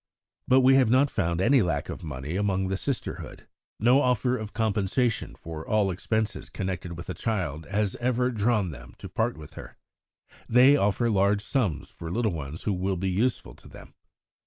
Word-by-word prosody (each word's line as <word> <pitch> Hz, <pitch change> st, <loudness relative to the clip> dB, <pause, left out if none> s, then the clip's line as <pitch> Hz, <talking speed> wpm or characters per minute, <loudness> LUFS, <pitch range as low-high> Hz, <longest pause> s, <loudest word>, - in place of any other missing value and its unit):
But 130 Hz, +1 st, +5 dB
we 130 Hz, +1 st, +6 dB
have 130 Hz, -4 st, +4 dB
not 130 Hz, +4 st, +4 dB
found 85 Hz, -5 st, -1 dB
any 130 Hz, +7 st, +4 dB
lack 85 Hz, -7 st, -1 dB
of -, -, -7 dB
money 75 Hz, +1 st, -5 dB
among 95 Hz, -1 st, 0 dB
the 95 Hz, -, 0 dB
Sisterhood. 125 Hz, +4 st, -5 dB, 0.3 s
No 125 Hz, +6 st, +5 dB
offer 125 Hz, 0 st, +1 dB
of 110 Hz, -3 st, -5 dB
compensation 110 Hz, +2 st, 0 dB
for 80 Hz, -1 st, -8 dB
all 105 Hz, -1 st, +1 dB
expenses 110 Hz, +4 st, -2 dB
connected 90 Hz, -3 st, -4 dB
with 85 Hz, -, -8 dB
a 90 Hz, -, -3 dB
child 80 Hz, -6 st, -3 dB
has 105 Hz, -1 st, 0 dB
ever 125 Hz, +1 st, 0 dB
drawn 105 Hz, -4 st, +1 dB
them 60 Hz, -4 st, -12 dB
to -, -, -8 dB
part -, -, -1 dB
with 75 Hz, -2 st, -11 dB
her. -, -, -11 dB, 0.7 s
They 125 Hz, +4 st, +7 dB
offer 110 Hz, -1 st, +1 dB
large 100 Hz, +1 st, +2 dB
sums 110 Hz, -, -1 dB
for 80 Hz, -, -8 dB
little 110 Hz, +4 st, 0 dB
ones 75 Hz, 0 st, -6 dB
who 105 Hz, -, 0 dB
will 95 Hz, +1 st, -1 dB
be 95 Hz, +1 st, -1 dB
useful 105 Hz, -, -1 dB
to -, -, -17 dB
them. -, -, -13 dB
100 Hz, 180 wpm, -26 LUFS, 90-120 Hz, 0.7 s, They